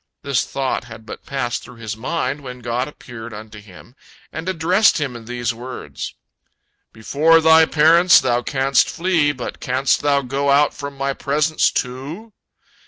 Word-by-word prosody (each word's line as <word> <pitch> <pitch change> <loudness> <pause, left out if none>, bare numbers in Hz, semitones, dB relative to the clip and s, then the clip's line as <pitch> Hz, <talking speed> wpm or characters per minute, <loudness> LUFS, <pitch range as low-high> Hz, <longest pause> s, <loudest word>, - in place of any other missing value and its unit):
This 140 -3 0
thought 135 -3 -2
had 110 -2 -12
but 110 - -10
passed 130 -4 -2
through 125 - -13
his 115 -2 -6
mind 135 +3 -3
when 125 -2 -9
God 120 +2 -2
appeared 115 -6 -10
unto 105 0 -10
him, 105 +3 -16 0.4
and 160 +3 -4
addressed 185 +4 +3
him 140 -5 -3
in 115 -1 -10
these 120 0 -2
words: 125 +2 -7 0.8
"Before 150 +9 +3
thy 160 0 +6
parents 165 +3 +6
thou 120 0 0
canst 135 +1 +1
flee, 170 -4 +1
but 125 -4 -7
canst 130 +2 +1
thou 140 -1 +2
go 135 +2 -1
out 145 +1 +4
from 140 -1 -8
My 135 0 -1
presence, 150 +3 +1
too? 145 - -5
135 Hz, 160 wpm, -20 LUFS, 120-150 Hz, 0.8 s, thy